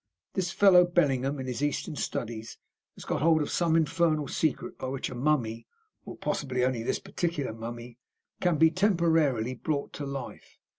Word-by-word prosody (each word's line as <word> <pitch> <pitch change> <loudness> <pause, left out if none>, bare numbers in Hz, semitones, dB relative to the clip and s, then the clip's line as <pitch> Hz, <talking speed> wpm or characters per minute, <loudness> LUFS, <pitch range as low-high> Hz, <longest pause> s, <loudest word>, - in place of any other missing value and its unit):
This 185 -2 -1
fellow 190 -2 +6
Bellingham, 145 -6 +1
in 130 - -4
his 125 +1 -4
Eastern 145 +1 -1
studies, 115 -3 -4 0.4
has - - -11
got - - -2
hold 160 -1 +4
of - - -5
some 170 -2 +2
infernal 160 -2 +2
secret 180 +6 -1
by 130 - -4
which 135 0 -3
a - - -5
mummy 120 -4 0 0.4
or - - -8
possibly 130 -3 -1
only 130 -3 0
this 115 - -1
particular 160 -9 -3
mummy 120 +1 -8 0.4
can 175 -3 +2
be 160 +1 +5
temporarily 165 - +2
brought 140 +3 -3
to 145 - -5
life. 135 -2 -7
145 Hz, 165 wpm, -28 LUFS, 125-165 Hz, 0.4 s, fellow